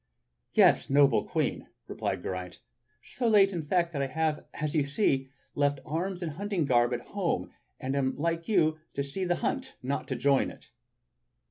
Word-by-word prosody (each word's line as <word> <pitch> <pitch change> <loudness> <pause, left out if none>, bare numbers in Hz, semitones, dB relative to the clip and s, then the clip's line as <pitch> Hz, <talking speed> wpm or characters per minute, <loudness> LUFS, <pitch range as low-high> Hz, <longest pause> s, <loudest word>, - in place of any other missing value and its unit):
"Yes, - - +5
noble 140 0 +4
Queen," - - -1 0.2
replied - - -3
Geraint, 90 -1 -5 0.5
"so 245 - -2
late, 200 -3 +5
in 170 - -2
fact, 170 +2 0
that 140 - -1
I 135 - 0
have, 155 +2 -1
as 150 0 -2
you 155 - +3
see, 140 -3 +1 0.2
left 145 -1 +1
arms 175 +5 -3
and 165 - -2
hunting 190 0 -1
garb 120 -2 +3
at 120 -1 -2
home, 195 +2 -2 0.3
and 130 +1 -2
am 135 -1 +1
come, - - -12
like 165 +1 -1
you, 155 -7 +2 0.2
to 140 - 0
see 140 +7 -4
the 175 0 +1
hunt, 265 -1 -2
not 135 +3 -2
to 130 - -2
join 140 +2 +2
it." - - -15
150 Hz, 180 wpm, -29 LUFS, 140-175 Hz, 0.5 s, Yes